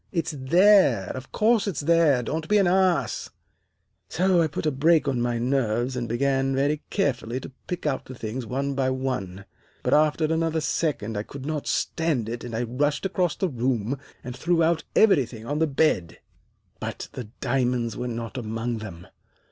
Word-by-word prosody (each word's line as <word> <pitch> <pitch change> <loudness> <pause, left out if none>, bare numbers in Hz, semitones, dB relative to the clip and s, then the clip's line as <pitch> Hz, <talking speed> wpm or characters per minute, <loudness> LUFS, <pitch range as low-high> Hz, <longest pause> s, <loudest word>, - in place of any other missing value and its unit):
It's 170 -4 -1
there, 150 - +4
of 130 0 -8
course 220 0 +2
it's 175 -9 -2
there. 155 -5 +3
Don't 160 +5 -3
be 210 - +4
an 200 - +4
ass.' 185 -1 +1 0.8
"So 185 0 +3
I 160 - +3
put 150 - -5
a 155 - +2
brake 155 +3 +3
on 130 -3 0
my 120 0 0
nerves 120 0 0
and 120 -2 -3
began 135 +2 +1
very 145 +3 +1
carefully 130 - -1
to 135 - -9 0.2
pick 180 - -4
out 140 -3 -1
the 130 - -9
things 115 +2 -5
one 140 +3 -2
by 135 -1 0
one, 125 -8 -3 0.4
but - - +1
after 155 +1 +3
another 160 0 0
second 140 -9 -1
I 105 - -1
could 135 +5 -9
not 150 -1 -3
stand 155 -10 0
it, 120 +1 -5
and 120 -2 -5
I 115 - 0
rushed 145 - -1
across 180 -3 0
the 190 - 0
room 125 - -1 0.3
and 125 0 -6
threw 165 +5 +1
out 165 0 +2
everything 130 - +3
on 145 +4 -2
the 160 - +3
bed. 135 - +1 0.6
But - - -5
the 125 - -6
diamonds 125 -3 0
were 125 - -3
not 115 -1 -4
among 115 +1 -3
them. 90 -5 -9
135 Hz, 180 wpm, -25 LUFS, 120-160 Hz, 0.8 s, there